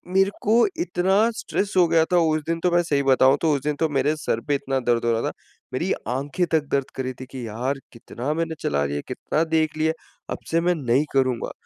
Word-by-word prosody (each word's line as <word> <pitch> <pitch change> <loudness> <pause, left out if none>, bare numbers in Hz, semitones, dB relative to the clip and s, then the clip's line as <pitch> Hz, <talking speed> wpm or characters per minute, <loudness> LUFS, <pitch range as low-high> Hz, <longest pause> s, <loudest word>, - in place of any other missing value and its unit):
मेरे 195 +1 +4
को 225 +3 +4 0.2
इतना 195 - +2
स्ट्रेस 200 - -2
हो 175 -2 +6
गया 160 0 +4
था - - +5 0.2
उस 155 - 0
दिन 165 0 -1
तो 180 - +2
मैं 175 0 +4
सही 140 -3 0
बताऊँ 135 +1 +5
तो 160 -2 +3
उस 140 - -1
दिन 150 -1 0
तो 160 -1 +2
मेरे 145 +2 +1
सर 115 - -1
पे 145 - +2
इतना 135 -1 -1
दर्द 120 -1 +1
हो 115 - +3
रहा 115 0 +1
था, - - -6 0.4
मेरी - - -1 0.2
आँखें 140 +8 -1
तक 155 -3 +1
दर्द 140 -1 0
कर 130 - -2
रही 130 0 -3
थी - - -6
कि 125 -4 -6
यार 125 +6 -2
कितना 120 +4 -4
मैंने 165 0 -2
चला 70 0 0
लिया, 70 +1 -2
कितना 155 - -1
देख 160 -1 0
लिया 160 +1 +1 0.4
अब - - -5
से 165 0 +3
मैं 175 0 +2
नहीं 135 0 +1
करूँगा, 130 -3 +1
145 Hz, 235 wpm, -23 LUFS, 130-165 Hz, 0.4 s, हो